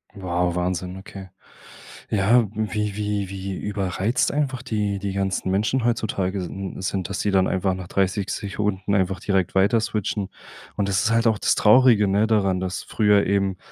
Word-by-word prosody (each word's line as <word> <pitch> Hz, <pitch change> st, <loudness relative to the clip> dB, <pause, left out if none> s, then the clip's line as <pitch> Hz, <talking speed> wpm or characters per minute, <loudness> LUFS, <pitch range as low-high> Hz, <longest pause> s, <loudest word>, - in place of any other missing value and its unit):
Wow, 90 Hz, -2 st, -1 dB
Wahnsinn, 90 Hz, +1 st, -2 dB
okay. 95 Hz, -1 st, -10 dB, 0.8 s
Ja, 110 Hz, +3 st, +3 dB
wie 105 Hz, -1 st, -2 dB
wie 105 Hz, -2 st, -2 dB
wie 95 Hz, 0 st, -5 dB
überreizt 100 Hz, +3 st, -1 dB
einfach 140 Hz, -4 st, -1 dB
die 105 Hz, -5 st, -2 dB
die 100 Hz, 0 st, -3 dB
ganzen 95 Hz, -1 st, -1 dB
Menschen 110 Hz, +6 st, +1 dB
heutzutage 100 Hz, -5 st, -1 dB
sin 95 Hz, +2 st, -6 dB
sind, 95 Hz, 0 st, -2 dB
dass 100 Hz, -, -3 dB
die 105 Hz, -, 0 dB
dann 95 Hz, -1 st, +3 dB
einfach 95 Hz, 0 st, 0 dB
nach 90 Hz, -1 st, -7 dB
30 95 Hz, +1 st, 0 dB
Sekunden 100 Hz, -1 st, -2 dB
einfach 95 Hz, -1 st, +1 dB
direkt 95 Hz, -2 st, 0 dB
weiter 100 Hz, +4 st, +4 dB
switchen. 105 Hz, -2 st, -2 dB, 0.5 s
Und 100 Hz, -1 st, -1 dB
das 95 Hz, -1 st, +1 dB
ist 110 Hz, -, +1 dB
halt 115 Hz, +1 st, +2 dB
auch 110 Hz, -2 st, +2 dB
das -, -, +2 dB
traurige, 110 Hz, -2 st, +5 dB
ne, 100 Hz, +3 st, +2 dB
daran, 95 Hz, -4 st, +2 dB
dass 90 Hz, -1 st, -4 dB
früher 105 Hz, -2 st, +2 dB
eben 100 Hz, -1 st, 0 dB
100 Hz, 170 wpm, -23 LUFS, 95-105 Hz, 0.8 s, traurige